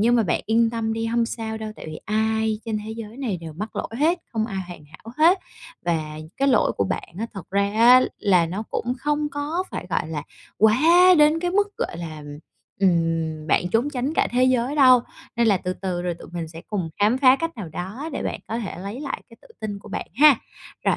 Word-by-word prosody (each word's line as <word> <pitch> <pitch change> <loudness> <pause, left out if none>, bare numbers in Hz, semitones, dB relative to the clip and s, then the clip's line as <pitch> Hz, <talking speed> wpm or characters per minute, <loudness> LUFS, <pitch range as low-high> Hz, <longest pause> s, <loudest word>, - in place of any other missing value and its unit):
nhưng 240 +3 +4
mà 230 - +4
bạn 195 - 0
yên 225 +1 +3
tâm 225 -1 -2
đi 225 0 -2
hông 230 0 +1
sao 225 -1 -4
đâu, 215 -1 -6
tại - - -10
vì 155 0 -7
ai 220 0 0
trên 220 -2 -2
thế 220 - -6
giới 225 -2 -6
cái 230 - -14
này 240 -9 -2
đều 165 -2 -8
mắc 210 +8 -7
lỗi - - -3
hết, 330 +5 +3
không 220 -2 0
ai 195 -4 -4
hoàn 175 -4 -10
hảo 160 +10 -13
hết, 340 +5 +6 0.5
và 155 -3 -2 0.2
cái 275 - +2
lỗi 250 -5 +3
của 100 - +1
bạn - - -3
á 225 - -2
thật 195 - -9
ra 200 +1 +1
á 240 +4 +7 0.2
là 180 -4 +3
nó 185 +6 -4
cũng 245 +2 -2
không 295 +2 0
có 300 +6 -2
phải, - - -5
gọi 155 - -1
là, 155 -2 -4 0.4
quá 220 +2 +5 0.4
đến 300 +2 +5
cái 355 0 -1
mức, 405 +2 0
gọi - - -3
là, 160 -3 -7 0.6
ừm, 165 -4 +1
bạn 175 +3 +2
trốn 235 +9 +1
tránh 270 +2 -2
cả - - +2
thế 250 +1 +3
giới 255 +1 +1
đâu. 255 -3 +7 0.4
Nên 235 0 +3
là 205 -3 +4
từ 180 0 -3
từ 185 -2 -4
rồi 175 -1 -2
tụi - - -13
mình 170 -2 -4
sẽ 165 +1 -10
cùng 185 -6 -3
khám 215 +5 +3
phá 260 -1 +6
cách 330 0 -4
nào 200 -7 -6
đó 190 - -6
để - - -3
bạn - - -3
có 225 - -2
thể 215 -7 -5
lấy 200 +7 -6
lại 285 -2 -5
cái 230 - -16
tự - - -18
tin 210 -2 -4
của - - -14
bạn - - -4
ha! 290 +2 +7 0.5
Rồi, - - +3
220 Hz, 240 wpm, -23 LUFS, 180-255 Hz, 0.6 s, á